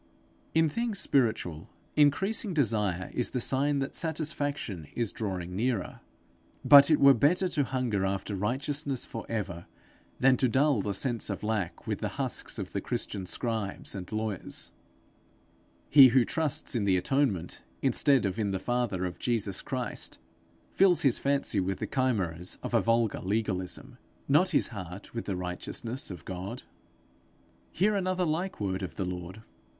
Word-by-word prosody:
In 160 0 +5
things 230 +6 -2
spiritual, 110 - 0 0.3
increasing 185 +7 +2
desire 105 - 0
is 125 - 0
the 125 - -2
sign 140 +4 +2
that 135 0 -2
satisfaction 145 - -2
is 115 -4 -1
drawing 90 -4 -4
nearer. 115 -2 -1 0.7
But 140 0 +9
it 155 - +4
were 140 0 +8
better 170 - +3
to 145 - +1
hunger 125 -7 -1
after 95 +1 -2
righteousness 135 +6 -2
for 115 - -7
ever 95 -7 -4 0.5
than 130 0 +5
to 130 - +2
dull 130 -1 +2
the 100 0 -2
sense 120 +1 0
of 100 - -4
lack 105 -5 -2
with - - -2
the - - -2
husks - - -2
of - - -5
the - - -1
Christian 95 -3 -3
scribes 110 -4 -3
and 95 0 -7
lawyers: 110 -3 -3 1.2
he 140 -2 +9
who 125 -1 +4
trusts 160 -4 0
in 115 -5 0
the 95 -2 +3
atonement 100 - 0 0.2
instead 135 -6 +4
of 100 +3 -2
in 105 -2 0
the 95 - -1
father 120 -5 -1
of 90 - -5
Jesus 110 -6 -1
Christ, 125 -4 -4 0.5
fills 190 -3 +4
his 135 -4 +3
fancy 140 -7 +1
with 95 0 -1
the - - -3
chimeras 95 -10 -1
of - - -5
a - - +4
vulgar 115 -2 +1
legalism, 105 +5 -3 0.3
not 150 +7 +4
his 160 - +1
heart 95 -3 -8
with 115 - -4
the 100 - -2
righteousness 90 +7 -3
of 90 -3 -9
God. 95 +1 -6 1.1
Hear 205 +5 +2
another 185 -2 0
like 175 +4 -2
word 95 -2 -2
of 85 -4 -5
the 95 - -2
Lord. 90 +3 -6
115 Hz, 155 wpm, -29 LUFS, 95-140 Hz, 1.2 s, But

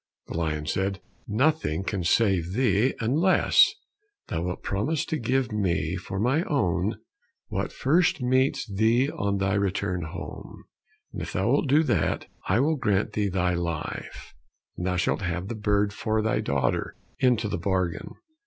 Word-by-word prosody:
The - - -5
lion 80 -2 -1
said, 95 +4 -1 0.3
"Nothing 120 - +1
can 95 -2 -2
save 90 -2 +2
thee, 120 +1 +2
unless 150 +12 +4 0.6
thou 80 - -2
wilt 90 +1 -4
promise 135 +11 -1
to 160 - -2
give 125 +1 0
me 90 -5 0
for 95 +1 -5
mine 135 - +2
own 110 - 0 0.5
what - - -2
first 160 +5 +2
meets 130 +1 +1
thee 115 +7 +2
on 100 0 -1
thy 95 0 0
return 100 -2 0
home; 85 +2 -8 0.5
and - - -5
if - - -5
thou 95 +5 +1
wilt 140 +1 +2
do 150 +4 +5
that, - - 0 0.2
I 100 +5 +3
will 155 +2 +2
grant 105 -5 0
thee 105 -1 0
thy 90 -1 +1
life, 85 -3 -4 0.4
and 90 - -3
thou 90 - 0
shalt 90 +3 0
have 90 +1 -3
the - - -2
bird 105 -1 +1
for 110 +1 -1
thy 110 - +1
daughter, 65 -3 -1 0.2
into 125 -4 +2
the 100 - -3
bargain." 95 -2 -2
100 Hz, 160 wpm, -26 LUFS, 90-125 Hz, 0.6 s, do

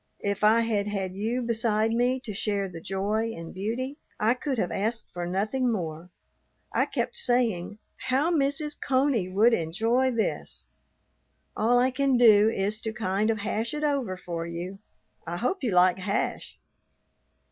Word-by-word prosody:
If 200 0 -1
I 220 +2 +6
had 215 -3 0
had 195 -3 -3
you 225 +6 -2
beside 225 -1 +1
me 245 +3 +1
to 220 -5 -5
share 200 0 -1
the 170 -3 -9
joy 210 +5 -1
and 165 0 -8
beauty, 235 +9 -3 0.2
I 220 +3 +3
could 265 +1 -3
have 185 - -1
asked 225 +4 -2
for 175 -1 -4
nothing 215 +8 0
more. 170 -4 -4 0.6
I - - +3
kept - - -2
saying, 225 -6 0 0.2
"How 275 +6 +1
Mrs. 295 0 0
Coney 260 -8 +1
would 215 +6 +4
enjoy 225 +10 +1
this!" 230 -3 -3 0.9
All 235 +3 +3
I 255 +1 +3
can 270 0 +2
do 220 -3 +7
is 210 +1 -1
to 220 - -3
kind 215 -1 0
of 225 - +1
hash 225 +7 -2
it 300 - -3
over 270 -11 0
for 170 -2 -5
you. 175 +3 -6 0.5
I 170 +1 -3
hope 250 - -1
you 245 - +1
like 180 -1 +4
hash. 200 +2 -2
220 Hz, 160 wpm, -27 LUFS, 195-245 Hz, 0.9 s, do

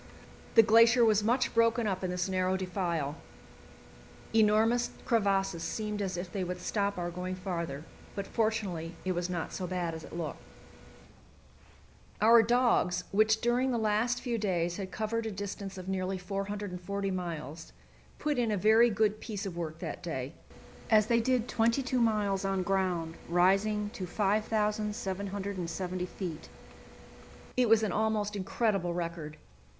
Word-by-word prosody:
The 225 - +9
glacier 230 +2 +6
was 215 -2 +3
much 245 +4 +1
broken 230 0 +3
up 195 -2 -1
in 185 - -1
this 180 0 -1
narrow 185 0 +1
defile; 170 -6 -2 1.2
enormous 225 +2 +4 0.2
crevasses 195 -6 +1
seemed 210 +3 -3
as 190 -2 -2
if 175 0 -5
they 195 -3 -2
would 180 0 -4
stop 200 0 -1
our 175 -1 -3
going 180 +1 -4
farther, 170 -6 -4 0.3
but 200 - -3
fortunately 200 -8 -1
it 185 - +1
was 175 0 -2
not 175 -2 -3
so 185 - -3
bad 175 -2 -2
as 160 0 -7
it - - -8
looked. 160 -4 -4 1.8
Our 230 +2 +7
dogs, 225 -6 +2
which 220 +2 +3
during 245 +2 +2
the 245 - 0
last 220 +3 +1
few 240 -3 -2
days 175 -4 0
had 195 -2 -5
covered 225 +3 -2
a - - -3
distance 195 0 -6
of 185 0 -8
nearly 190 0 -1
440 195 0 -4
miles, 165 -4 -5 0.5
put 295 -4 -1
in 235 -2 +1
a 210 - +1
very 220 +4 +5
good 215 0 +1
piece 210 -3 -5
of 185 -3 -5
work 160 -2 -4
that - - -6
day, - - -4 0.6
as 215 -2 +5
they 235 +1 +3
did 245 0 +1
twenty 230 +4 +2
two 255 0 0
miles 210 -4 +1
on 195 -1 0
ground 180 -4 -1
rising 195 +4 +2
to 185 -4 -6
5,770 200 -3 -1
feet. 175 -4 -6 1.1
It 250 -2 +3
was 225 0 +5
an 210 - 0
almost 210 0 0
incredible 195 -3 0
record. 165 -3 -4
200 Hz, 150 wpm, -30 LUFS, 180-220 Hz, 1.8 s, The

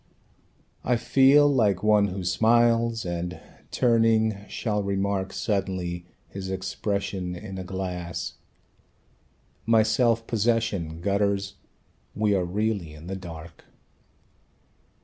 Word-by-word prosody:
I 125 - +2
feel 135 +4 +5
like 105 -9 +2
one 105 -1 +4
who 95 0 -5
smiles, 115 +3 +2
and 90 +1 -4 0.3
turning 115 -2 +3
shall 105 -3 -1
remark 100 -1 -1
Suddenly, 90 -4 -2 0.2
his 95 -1 -7
expression 95 -1 -3
in 95 +1 -7
a - - -4
glass. 90 -2 -4 1.3
My 115 -1 +5
self 115 +1 +2
possession 110 -8 -1
gutters; 100 0 0 0.6
we 105 0 +2
are 95 -3 +1
really 100 -4 -2
in 75 +2 -12
the 95 +2 -4
dark. 85 -3 -10
100 Hz, 105 wpm, -26 LUFS, 90-110 Hz, 1.3 s, feel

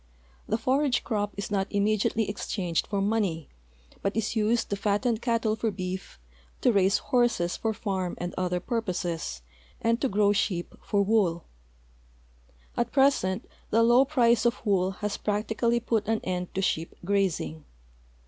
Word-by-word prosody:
The 220 - +1
forage 260 +2 +1
crop 205 -3 -1
is 200 +1 -4
not 195 -1 +1
immediately 215 +1 +1
exchanged 190 -4 -2
for 200 -1 -1
money, 195 -7 0 0.5
but 200 +2 -1
is 225 +1 -1
used 225 +1 +1
to - - +2
fatten 210 +4 +1
cattle 230 -2 +1
for 225 0 -1
beef, 185 -1 -5 0.4
to 250 - +4
raise 195 0 +4
horses 235 -9 +1
for 225 - -1
farm 195 -5 -3
and 175 0 -4
other 180 -1 -1
purposes, 175 - -3 0.4
and 230 +1 +1
to 270 - +1
grow 205 0 +3
sheep 190 -4 -1
for 200 -1 +1
wool. 195 -6 +1 1.3
At 240 0 -1
present 260 -8 +2 0.2
the 230 +2 +4
low 240 +3 +6
price 245 -5 +3
of 240 0 0
wool 190 -3 +2 0.2
has 210 - -1
practically 220 +3 0
put 225 -3 -1
an 225 0 +1
end 180 -1 -3
to 195 - 0
sheep 165 -3 -1
grazing. 175 - 0
205 Hz, 150 wpm, -27 LUFS, 185-230 Hz, 1.3 s, low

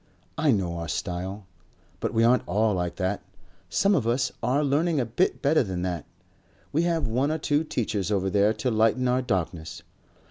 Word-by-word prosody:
I 155 - +1
know 95 -8 +1
our 85 0 -4
style.... 95 +4 -4 0.5
But - - -2
we 115 0 +2
aren't 125 +2 +3
all 105 +4 +2
like 90 -2 -2
that. 95 +1 -1 0.5
Some 195 - +3
of 135 - +1
us 120 +2 +1
are 130 +5 +1
learning 150 +3 +1
a 125 - +1
bit 120 - 0
better 150 +3 +4
than 95 -6 -3
that. 90 -4 -3 0.6
We 155 - +2
have 165 -4 +1
one 125 +6 +1
or 160 - 0
two 150 0 +1
teachers 110 - -2
over 95 -2 +1
there 105 +2 +4
to 110 +3 -1
lighten 115 +3 +2
our 125 +1 +2
darkness. 85 -7 -3
115 Hz, 185 wpm, -26 LUFS, 95-140 Hz, 0.6 s, better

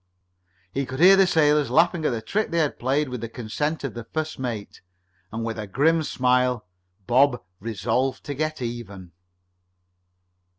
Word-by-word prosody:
He 135 +3 -2
could 130 +1 -6
hear 185 +3 +8
the 195 -1 +5
sailors 150 -5 +3
laughing 165 +5 +3
at - - +3
the 115 -3 -3
trick 210 - -1
they 170 - -2
had 155 -3 0
played, 140 +4 +1
with 125 -3 -5
the 115 - -5
consent 145 +8 -3
of 135 - -3
the 120 - -6
first 155 +6 -4
mate, 115 -5 -5 0.5
and 115 +1 -4
with 115 -1 -4
a 105 - -5
grim 160 - +2
smile 125 -5 +1 0.4
Bob 125 +2 +3 0.2
resolved 115 +5 -1
to 145 - -4
get 155 -1 -3
even. 100 -7 -7
130 Hz, 165 wpm, -24 LUFS, 115-155 Hz, 0.5 s, hear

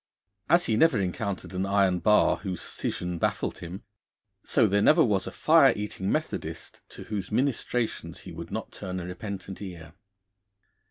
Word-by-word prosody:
As 175 +1 +5
he 110 - +1
never 135 -5 +4
encountered 95 -1 -3
an 95 +1 -1
iron 100 -2 +3
bar 105 +3 +4
whose 95 -4 -5
scission 90 -1 -3
baffled - - -1
him, 90 +3 -8 0.6
so 120 - +3
there 100 0 +2
never 155 +8 +6
was 100 -5 0
a - - -4
fire 145 - +5
eating 105 -2 -3
Methodist - - -4
to - - -10
whose 100 -3 -4
ministrations 125 -1 -1
he - - -10
would - - -8
not - - -5
turn 95 0 -5
a 85 - -6
repentant 95 +1 -6
ear. 85 -5 -8
100 Hz, 160 wpm, -27 LUFS, 90-110 Hz, 0.6 s, never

